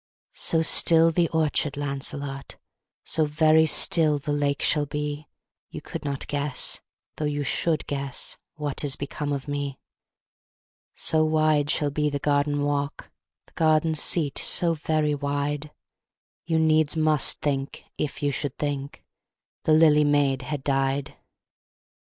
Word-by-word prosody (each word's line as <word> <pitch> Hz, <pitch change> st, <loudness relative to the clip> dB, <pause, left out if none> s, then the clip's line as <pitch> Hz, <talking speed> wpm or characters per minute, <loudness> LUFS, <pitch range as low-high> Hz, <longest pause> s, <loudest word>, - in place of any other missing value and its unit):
So 165 Hz, -1 st, +2 dB
still 165 Hz, 0 st, +6 dB
the 170 Hz, 0 st, +1 dB
orchard, 155 Hz, -2 st, 0 dB
Lancelot, 140 Hz, 0 st, -4 dB, 0.5 s
So 160 Hz, -, 0 dB
very 155 Hz, +1 st, +3 dB
still 155 Hz, -1 st, +4 dB
the 145 Hz, +1 st, -4 dB
lake 145 Hz, -1 st, -1 dB
shall 150 Hz, -1 st, +1 dB
be, 150 Hz, +1 st, -5 dB, 0.4 s
You -, -, -8 dB
could 165 Hz, -, -8 dB
not 140 Hz, -2 st, -4 dB
guess 145 Hz, -1 st, -1 dB, 0.4 s
though 155 Hz, -, -3 dB
you 145 Hz, 0 st, -2 dB
should 155 Hz, +2 st, -1 dB
guess 140 Hz, -2 st, -3 dB, 0.2 s
What 150 Hz, -2 st, -3 dB
is 140 Hz, -2 st, 0 dB
become 145 Hz, +1 st, -5 dB
of 140 Hz, 0 st, -4 dB
me. 145 Hz, -2 st, -4 dB, 1.2 s
So 155 Hz, 0 st, +3 dB
wide 155 Hz, -2 st, +1 dB
shall 145 Hz, -1 st, 0 dB
be 150 Hz, +1 st, -1 dB
the 145 Hz, -, -3 dB
garden 145 Hz, 0 st, 0 dB
walk, 145 Hz, 0 st, -3 dB, 0.3 s
The -, -, -27 dB
garden 160 Hz, 0 st, +2 dB
seat 150 Hz, -1 st, +1 dB
so 170 Hz, -1 st, +3 dB
very 155 Hz, -1 st, -1 dB
wide, 145 Hz, +1 st, -3 dB, 0.8 s
You 165 Hz, -1 st, 0 dB
needs 155 Hz, -1 st, +2 dB
must 155 Hz, -2 st, +2 dB
think 140 Hz, -2 st, -3 dB, 0.2 s
if 150 Hz, 0 st, -4 dB
you 145 Hz, -, +1 dB
should 140 Hz, 0 st, -3 dB
think 140 Hz, -1 st, -5 dB, 0.6 s
The 155 Hz, -, +3 dB
lily 155 Hz, -1 st, +5 dB
maid 145 Hz, -2 st, +1 dB
had 135 Hz, +2 st, -5 dB
died. 135 Hz, 0 st, -1 dB
145 Hz, 140 wpm, -24 LUFS, 140-155 Hz, 1.2 s, still